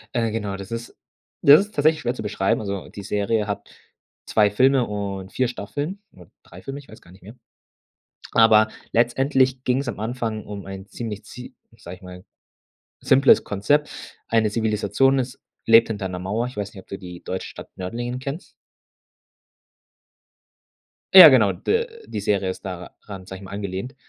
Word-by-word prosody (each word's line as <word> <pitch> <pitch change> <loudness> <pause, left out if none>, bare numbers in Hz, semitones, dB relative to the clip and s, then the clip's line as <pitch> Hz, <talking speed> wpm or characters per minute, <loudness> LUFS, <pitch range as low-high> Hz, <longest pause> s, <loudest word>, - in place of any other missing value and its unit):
Äh, 115 -2 0
genau, 105 -3 -3
das 100 +2 -10
ist 115 0 -6 0.5
das 145 +6 +8
ist 210 - -20
tatsächlich 155 +2 +2
schwer 120 -1 -1
zu 125 - -7
beschreiben. 100 0 0
Also 100 -2 -5
die 100 - -9
Serie 105 +2 -1
hat 105 - -5 0.6
2 105 -2 +3
Filme 130 +3 +3
und 100 -2 -5
4 130 -1 0
Staffeln 145 - -5
oder 90 -3 -17
3 90 +2 -14
Filme, 135 +1 -7
ich 140 - -16
weiß 110 - -14
gar 90 - -19
nicht 95 0 -18
mehr. 110 +6 -12 1.0
Aber 110 -1 +6 0.2
letztendlich 130 +2 +2
ging's 130 +1 0
am 120 - -5
Anfang 110 -1 -4
um 100 -1 -8
ein 95 0 -8
ziemlich 110 -4 -6
zie 125 +1 -11 0.2
sage 90 +2 -10
ich - - -28
mal, 90 0 -11 0.8
simples 135 +1 +5
Konzept. 145 +10 0 0.4
Eine 110 -2 +2
Zivilisation 110 +5 +1
ist 130 +1 -4 0.3
lebt 115 0 +6
hinter 100 -4 -3
'ner 90 0 -5
Mauer. 105 +6 -2
Ich 125 - -9
weiß 105 +1 -5
nicht, 95 - -10
ob - - -37
du 100 - -6
die 90 -1 -10
deutsche 95 - -5
Stadt - - -11
Nördlingen 120 +7 -4
kennst? 140 +6 -7 2.6
Ja, - - +13
genau, - - +5
d-die 460 - -3
Serie 100 -2 0
ist - - -6
daran, 95 +1 -9
sage 95 - -8
ich - - -15
mal, 95 - -11
angelehnt 100 +5 -5
110 Hz, 170 wpm, -22 LUFS, 100-125 Hz, 2.6 s, Ja